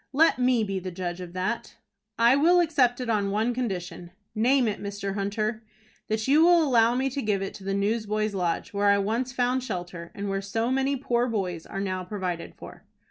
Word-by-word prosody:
"Let 310 -1 +4
me 250 -2 +3
be 195 -2 -2
the 185 0 -5
judge 180 0 -5
of 175 -1 -8
that." 185 +6 -3 0.4
"I 235 +3 +5
will 340 +5 +5
accept 275 -8 +2
it 250 - -4
on 210 -3 +1
one 220 +4 0
condition." 180 -8 -4 0.2
"Name 245 +3 +3
it, 210 - -3
Mr. 200 -1 -4
Hunter." 215 +2 -2 0.5
"That 220 +1 -1
you 300 +4 +5
will 345 -1 +6
allow 240 -4 +3
me 260 +2 +1
to 280 +2 -3
give 205 -4 0
it 195 - -5
to 205 -2 -11
the 195 0 -2
Newsboys' 215 +1 0
Lodge, 180 +3 -2
where 205 0 +1
I 200 - +5
once 225 +6 -1
found 250 0 0
shelter, 175 -6 -6
and 200 0 -4
where 195 0 -1
so 225 +5 -1
many 270 +1 +1
poor 245 -2 0
boys 185 -8 -3
are 195 - -5
now 185 -2 -2
provided 180 -3 -4
for." - - -12
215 Hz, 205 wpm, -26 LUFS, 195-245 Hz, 0.5 s, will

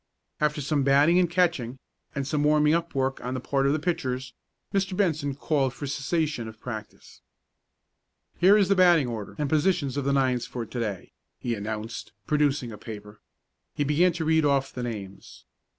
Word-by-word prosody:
After 150 0 +1
some 145 +1 0
batting 145 +6 +5
and 175 -2 +3
catching, 170 -9 +1 0.4
and 140 -1 -2
some 150 +1 0
warming 150 0 +4
up 170 -2 -1
work 135 0 -1
on 125 +1 -3
the - - -2
part 135 +2 0
of - - +3
the 150 - +2
pitchers, 130 -6 -2 0.4
Mr. 190 -1 0
Benson 155 -8 0
called 140 -3 0
for 145 - -6
a - - -4
cessation 145 -2 -1
of 110 0 -11
practice. 110 -4 -9 1.2
"Here 195 +4 +7
is 200 -3 +3
the 200 - +4
batting 175 -5 +5
order 110 -4 -6
and 150 - -1
positions 150 -2 +1
of 140 - -1
the 140 - +2
nines 130 -3 +1
for 120 -2 -5
to 120 - -6
day," 105 -5 -4 0.3
he 120 - -2
announced, 110 +1 -5
producing 145 -5 +1
a 105 - -9
paper. 105 -2 -10 0.5
He 145 - +1
began 155 +6 +3
to 160 -1 -3
read 160 0 +3
off 140 -2 +1
the 125 - -5
names. 105 -5 -7
140 Hz, 185 wpm, -26 LUFS, 125-160 Hz, 1.2 s, Here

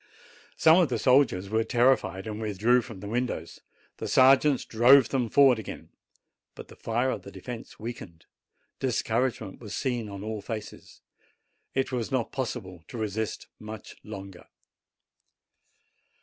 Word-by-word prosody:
Some 160 +3 +6
of 170 -6 +3
the 125 - 0
soldiers 125 -8 +3
were 110 +2 +1
terrified, 120 -6 +2
and 110 0 -5
withdrew 110 +4 +2
from 110 -5 -10
the 100 - -7
windows; 115 -7 -3 0.4
the - - -5
sergeants 135 +1 +5
drove 120 +3 +6
them 125 -4 0
forward 135 -1 +5
again. 110 - -8 0.7
But - - -11
the - - -13
fire 120 +3 -1
of - - -4
the - - -11
defence 120 -2 -9
weakened; 105 -7 -8 0.5
discouragement 120 -4 -1
was 105 -3 -6
seen 120 -5 -2
on 100 0 -7
all 110 -1 -4
faces. 110 0 -8 0.7
It 135 0 0
was 120 -3 -3
not 130 -4 -1
possible 105 -10 -5
to - - -8
resist 110 0 -3
much 110 0 -9
longer. 100 -4 -9
115 Hz, 140 wpm, -27 LUFS, 105-130 Hz, 0.7 s, Some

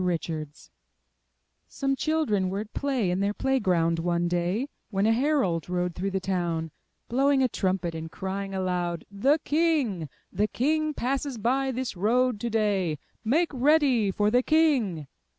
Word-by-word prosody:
Richards 160 -4 -4 1.0
Some 275 -1 -1
children 270 -12 0
were 195 +2 -2
at 215 +1 -10
play 260 -10 0
in 180 - 0
their 200 +1 0
play 265 0 +1
ground 170 -5 +1
one 170 0 0
day, 175 +8 0 0.2
when 195 -1 0
a 220 - +4
herald 235 - +1
rode 180 -1 -1
through 190 +3 -2
the 190 0 -1
town, 175 -4 -2 0.4
blowing 270 +2 +3
a - - +4
trumpet, 185 -6 -1
and 160 0 -6
crying 195 0 -4
aloud, 180 -2 -2
*The 265 +10 +3
King! 290 - +1 0.2
the 210 - +1
King 310 +6 0
passes 270 +1 -2
by 265 +5 +1
this 255 -2 -3
road 235 +4 +2
to 235 - -2
day. 200 -8 +1 0.3
Make 310 +10 +2
ready 265 -5 +3
for 205 +2 +1
the 245 +2 +4
King! 260 - +2
210 Hz, 155 wpm, -27 LUFS, 180-265 Hz, 1.0 s, a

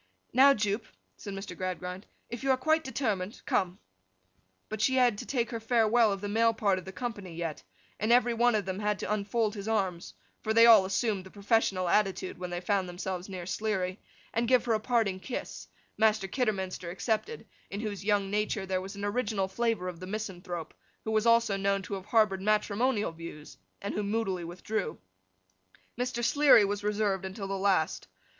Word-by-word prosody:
'Now, 275 +2 +7
Jupe,' 210 +1 -1 0.3
said 200 -2 -7
Mr. 195 -2 -7
Gradgrind. 185 +1 -5 0.2
'If 235 -1 -6
you 270 - -1
are 260 - +4
quite 315 +4 +2
determined, 215 -8 -2
come!' 185 -1 0 0.9
But 215 -1 -5
she 260 - +3
had 245 -5 +3
to - - -7
take 240 -3 -1
her 230 - -3
farewell 225 -1 +3
of 195 -1 -3
the 205 - -3
male 225 +2 +2
part 200 -4 +1
of 185 - -12
the 190 - -7
company 205 -6 -5
yet, 165 - -4 0.4
and 215 +2 +1
every 240 0 +5
one 240 0 +3
of 205 -4 0
them 190 0 -3
had 210 -1 0
to - - -1
unfold 215 +1 0
his 200 -1 -6
arms 190 -6 -1 0.3
(for 220 0 -1
they 230 0 +8
all 220 -5 +8
assumed 195 0 0
the 190 - -12
professional 200 -2 +1
attitude 190 -1 0
when 180 -1 -4
they 175 0 -3
found 190 -1 0
themselves 180 +1 -5
near 185 -2 -6
Sleary), 190 -1 -2 0.3
and 230 +1 0
give 255 0 +4
her 235 - +2
a 215 - +2
parting 220 -5 +1
kiss—Master 215 -2 -2
Kidderminster 190 -7 -2
excepted, 220 - -2 0.2
in 200 - -5
whose 205 -3 -4
young 200 -1 +1
nature 210 -1 -1
there 185 -1 -1
was 195 +2 -7
an 200 0 -4
original 205 -2 0
flavour 225 -3 -1
of 180 -2 -6
the 185 - -7
misanthrope, 180 -5 -5 0.3
who 220 - -3
was 220 +1 +2
also 230 -3 +4
known 195 0 0
to 195 - -6
have 190 -1 -5
harboured 210 -4 +3
matrimonial 215 +2 +1
views, 165 -2 -10 0.3
and 200 - -3
who 210 - -1
moodily 200 -3 -1
withdrew. 175 +2 -3 1.0
Mr. 245 -1 -2
Sleary 285 -7 +6
was 205 +1 -2
reserved 205 -2 0
until 190 +1 -5
the 195 - -3
last. 190 -5 +1
205 Hz, 190 wpm, -29 LUFS, 190-225 Hz, 1.0 s, they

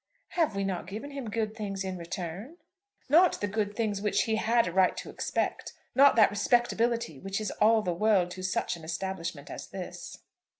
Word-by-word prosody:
"Have 320 - 0
we 200 - -1
not 190 -3 -3
given 220 +9 -6
him 275 -5 -5
good 220 0 -2
things 200 -3 -4
in 190 -1 -3
return?" 175 - -6 0.5
"Not 335 +6 +5
the - - 0
good 205 0 -2
things 210 -3 -1
which 210 -1 +2
he 220 -1 0
had 230 +2 +3
a - - -2
right 185 +1 +3
to - - -6
expect, - - -2 0.2
not 275 +2 +6
that 220 -3 +6
respectability 230 - +1
which 195 +4 -3
is 215 - -3
all 220 0 +5
the 180 - 0
world 185 -1 +2
to 185 - -7
such 190 -1 -1
an 165 - -12
establishment 165 -2 -4
as - - -7
this." - - -7
205 Hz, 195 wpm, -29 LUFS, 185-230 Hz, 0.5 s, not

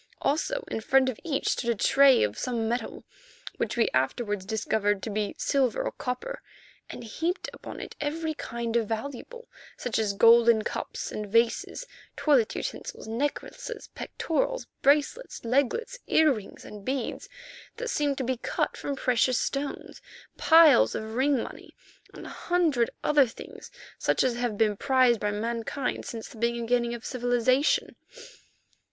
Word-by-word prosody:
Also, - - 0
in 225 - -4
front 265 +3 +3
of 245 - -6
each 295 -5 -1
stood 235 - -1
a 235 - +2
tray 270 +5 +5
of 105 0 -1
some 235 -3 -2
metal, 240 +2 -3 0.5
which - - -2
we 230 - +3
afterwards 205 - 0
discovered 205 -2 0
to 220 - -3
be 205 0 -2
silver 265 -4 +1
or - - -2
copper, 260 - -5 0.5
and - - -8
heaped 325 - -3
upon - - -9
it - - -8
every 315 +2 -2
kind 235 -5 -4
of 230 -2 +2
valuable, 280 - -6 0.3
such 240 -3 -2
as 210 -2 0
golden 230 +1 +6
cups - - -4
and 210 -1 -5
vases, 230 - +1 0.3
toilet 270 -8 +2
utensils, - - -5
necklaces, 285 - -4
pectorals, - - -2 0.2
bracelets, 295 - +1
leglets, 285 - 0
earrings 275 -11 +1
and 210 -1 -10
beads 260 0 -3 0.5
that - - -4
seemed 285 -2 0
to 265 - -2
be 255 0 -1
cut - - -2
from 285 - -4
precious 250 -1 +2
stones, 280 0 -3 0.3
piles 320 - +6
of 220 0 -5
ring 265 +1 +2
money, - - -11 0.4
and - - -10
a - - -7
hundred 320 -10 +1
other 290 -3 +4
things 225 - -11 0.3
such - - +2
as 255 - +2
have 240 -3 -2
been 215 -1 +2
prized 255 0 +3
by 210 - 0
mankind 230 +5 -3
since 225 -1 -6
the - - -14
beginning 235 +1 0
of 235 - -10
civilization. 250 +2 +1
245 Hz, 150 wpm, -27 LUFS, 225-285 Hz, 0.5 s, golden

